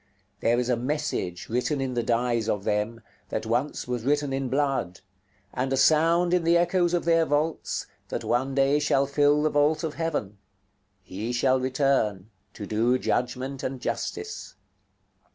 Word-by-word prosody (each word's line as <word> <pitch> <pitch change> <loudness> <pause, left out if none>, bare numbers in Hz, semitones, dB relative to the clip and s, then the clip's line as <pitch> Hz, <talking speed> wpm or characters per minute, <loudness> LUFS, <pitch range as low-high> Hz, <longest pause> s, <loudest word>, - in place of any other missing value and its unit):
There 115 +3 +2
is 125 - -1
a 125 - +2
message 125 - -3
written 125 +5 -1
in 135 -1 -2
the 120 - 0
dyes 115 -1 0
of 105 -3 -1
them, 105 +3 -1 0.3
that - - -3
once 120 +6 -1
was 125 -2 -3
written 145 +1 +1
in 135 -1 -2
blood; 135 -11 -1 0.5
and 130 +1 -2
a 135 - +1
sound 165 +5 +4
in 180 -2 +2
the 170 +1 +4
echoes 175 0 +2
of 175 - -1
their 165 -1 +4
vaults, 155 +1 -1 0.2
that - - -3
one 130 +3 0
day 140 +1 +3
shall 140 -2 +2
fill 145 +1 +3
the 155 - +2
vault 145 +3 +2
of 160 -2 -2
heaven, 145 -13 -3 0.6
"He 105 +6 -5
shall 130 +2 +2
return, 130 -7 0 0.2
to 105 - -6
do 115 +5 +2
judgment 130 +2 -2
and 130 0 -4
justice." 435 - -5
135 Hz, 165 wpm, -26 LUFS, 120-150 Hz, 0.6 s, sound